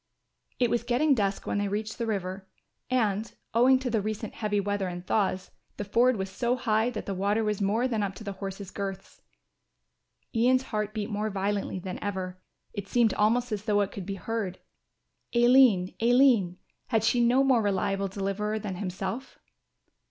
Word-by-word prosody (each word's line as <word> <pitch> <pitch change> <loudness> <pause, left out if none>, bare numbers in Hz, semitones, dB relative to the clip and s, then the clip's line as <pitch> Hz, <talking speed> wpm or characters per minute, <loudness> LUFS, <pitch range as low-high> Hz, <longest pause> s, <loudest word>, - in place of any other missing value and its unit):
It 245 -3 +2
was 240 - +2
getting 250 +5 +2
dusk 200 -5 -1
when - - -1
they 205 - 0
reached 215 +3 -3
the 230 - -1
river, 190 -2 -3 0.4
and, 220 -4 0 0.2
owing 250 +3 +5
to 255 -1 -3
the 220 -2 +1
recent 215 +1 -4
heavy 210 -2 -1
weather 200 -1 -1
and 175 0 -6
thaws, 190 -3 0 0.3
the - - -3
ford 235 +5 +3
was 190 0 -2
so 240 +5 0
high 225 -2 +1
that 230 -3 -5
the 200 - -3
water 200 +4 +1
was 210 -1 -1
more 215 +6 +2
than 225 -4 -1
up 195 -2 -2
to 205 - -9
the 200 - -4
horses' 195 0 -7
girths. 195 -1 -6 1.1
Ian's 255 +2 +3
heart 215 -3 -3
beat 215 +1 -3
more 210 +1 -1
violently 200 0 -2
than 185 0 -6
ever; 185 -2 -4 0.3
it 205 -2 -5
seemed 230 -1 +3
almost 235 +3 +2
as 210 0 -3
though 205 -2 +3
it 200 0 -1
could 195 -3 -7
be 195 - -3
heard. 195 -1 -3 0.8
"Aline, 240 -6 +5
Aline, 235 -7 +4 0.3
had 225 -3 +1
she 240 +2 +3
no 250 +3 +4
more 260 -4 +4
reliable 195 -1 0
deliverer 200 +2 -2
than 200 -4 -5
himself?" 195 +6 -5
210 Hz, 180 wpm, -28 LUFS, 195-235 Hz, 1.1 s, owing